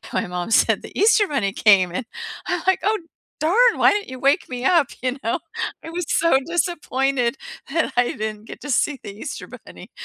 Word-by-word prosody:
my - - -1
mom 180 +3 -4
said, 225 - +3
"The - - -9
Easter 420 -1 +4
bunny 220 -9 -1
came!" 195 -4 +4
And, 230 +5 -4 0.4
I'm, - - -1
like, 380 - +3
"Oh 430 +2 +1 0.4
darn! 445 +11 +4
Why - - +6
didn't 410 0 -2
you 260 - -7
wake 280 +6 +2
me 250 0 -5
up," 330 -6 +4
you 255 +1 -1
know, 230 - 0 0.5
I 325 - -7
was 345 -1 -4
so 335 -5 +3
disappointed 275 -7 0 0.4
that 320 -4 0
I 245 - +3
didn't 215 0 -5
get - - -10
to 290 - -6
see 280 +2 +1
the - - -7
Easter 275 +6 -7
bunny, - - -13
275 Hz, 195 wpm, -22 LUFS, 230-345 Hz, 0.5 s, Why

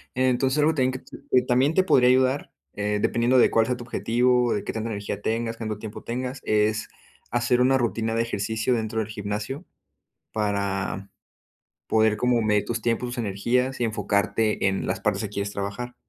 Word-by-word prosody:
Entonces, 130 +2 +2
algo 155 +2 +4
que - - -9
también 130 0 -4 0.3
que 125 - +5
también 130 +5 +3
te 190 - +4
podría 125 -8 +5
ayudar, 130 +2 +2 0.2
eh, 105 0 -1
dependiendo 120 +2 +2
de - - +5
cuál 115 -1 +3
sea 125 -1 -1
tu 120 - -8
objetivo, 125 0 +2
de 105 - -2
qué - - -4
tanta 115 +1 -3
energía 100 -1 -4
tengas, 115 +1 -2
cuánto 110 -2 -4
tiempo 105 0 -8
tengas 125 +3 -4
es, 110 0 +1 0.4
hacer 120 +1 +2
una 130 +1 +4
rutina 115 -2 -1
de 115 - +2
ejercicio 110 +2 -1
dentro 110 -1 -1
del 110 - -1
gimnasio, 105 - -4 0.7
para, 100 -2 -2 0.8
poder 110 -1 +3
como 125 0 +2
medir 105 -1 +2
tus 115 -1 -3
tiempos, 120 +2 0
tus 120 - -6
energías 120 +6 0
y - - 0
enfocarte 105 -1 0
en 95 - -1
las - - -1
partes - - 0
que 105 - -3
quieres 100 0 -3
trabajar. 100 +5 -5
115 Hz, 185 wpm, -25 LUFS, 105-125 Hz, 0.8 s, que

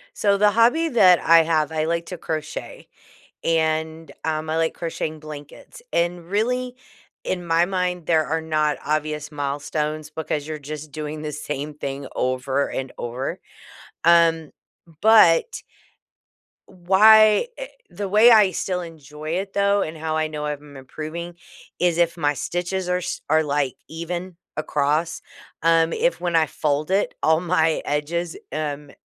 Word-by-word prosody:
So, 200 -1 +2
the 210 0 +5
hobby 245 +9 +3
that 185 -8 +6
I 165 0 +6
have, 160 -2 0
I 155 -1 0
like 170 +1 -1
to 180 - -7
crochet, 155 -1 -6 0.6
and, 160 0 0
um, 155 0 -2
I 160 - -1
like 165 0 0
crocheting 160 -2 -4
blankets. 150 - -11
And, 175 0 -1
really, 250 +5 -1 0.5
in 180 -2 -3
my 165 +1 +3
mind, 180 -3 -2
there 160 -2 +2
are 160 +1 -1
not 155 -1 0
obvious 150 0 -2
milestones, 150 +2 -3
because 150 -2 -4
you're 155 -1 -5
just 150 0 -8
doing 155 +1 -5
the 150 - -4
same 150 0 -5
thing 140 -1 -5
over 130 +2 -1
and 130 -1 -4
over. 120 +3 -4 0.7
Um, 165 -2 +4 0.5
but 215 - +5 1.0
why 215 - +5
eh - - -5 0.2
the 205 - -5
way 215 +5 +6
I 210 -4 +6
still 180 +1 -2
enjoy 155 -2 -8
it, 190 +3 -3
though, 200 0 +2
and 160 0 -4
how 155 0 -3
I 155 0 0
know 150 -1 -5
if 150 -1 -3
I'm 145 -2 -13
improving 155 +6 -7 0.5
is 175 -2 +2
if 170 -1 +2
my 145 -2 +1
stitches 175 +5 -3
are 180 0 +1
s 180 - -4
are, 155 +1 +4
like, 140 -3 0
even 175 +2 -6 0.2
across. 150 +2 0 0.4
Um, 165 0 +4
if - - 0
when 175 -1 -1
I 160 -1 +4
fold 150 +2 -2
it, 195 +1 +1
all 160 0 +4
my 160 -3 +1
edges, 165 +3 -2
um, 150 -2 -4
160 Hz, 155 wpm, -22 LUFS, 150-180 Hz, 1.0 s, that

